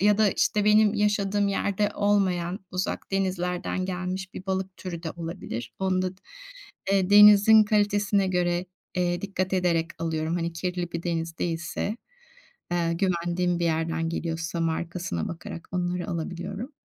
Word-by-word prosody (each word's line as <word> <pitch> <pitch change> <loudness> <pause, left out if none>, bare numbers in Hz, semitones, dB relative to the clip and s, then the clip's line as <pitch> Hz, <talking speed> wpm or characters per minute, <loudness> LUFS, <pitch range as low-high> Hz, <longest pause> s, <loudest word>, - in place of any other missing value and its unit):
ya 205 +1 +4
da, 215 -2 +5
işte, 210 +2 +1
benim 210 0 +5
yaşadığım 205 -1 +1
yerde 200 +1 0
olmayan 190 -3 +1
uzak 185 +2 -3
denizlerden 185 -1 -1
gelmiş 185 +1 -4
bir 185 - -8
balık 190 0 -2
türü 170 -3 -6
de 160 - -3
olabilir. 165 - -6
Onu 190 -1 +1
da 185 0 -2
d - - -29 0.7
eee, 195 -1 +2
denizin 210 +1 +8
kalitesine 205 -1 +2
göre, 175 0 0 0.3
eee, 175 -1 0
dikkat 190 -1 -2
ederek 175 -3 +2
alıyorum. 160 0 -1
Hani 170 0 -2
kirli 175 0 -3
bir 170 - -3
deniz 165 -1 -3
değilse, 170 +6 -2 0.8
eee, 170 -1 +1
güvendiğim 175 0 0
bir 170 - +1
yerden 165 0 0
geliyorsa 165 0 -3
markasına 170 +2 -2
bakarak 165 0 -8
onları 180 0 -2
alabiliyorum. 185 - -4
180 Hz, 145 wpm, -26 LUFS, 170-195 Hz, 0.8 s, denizin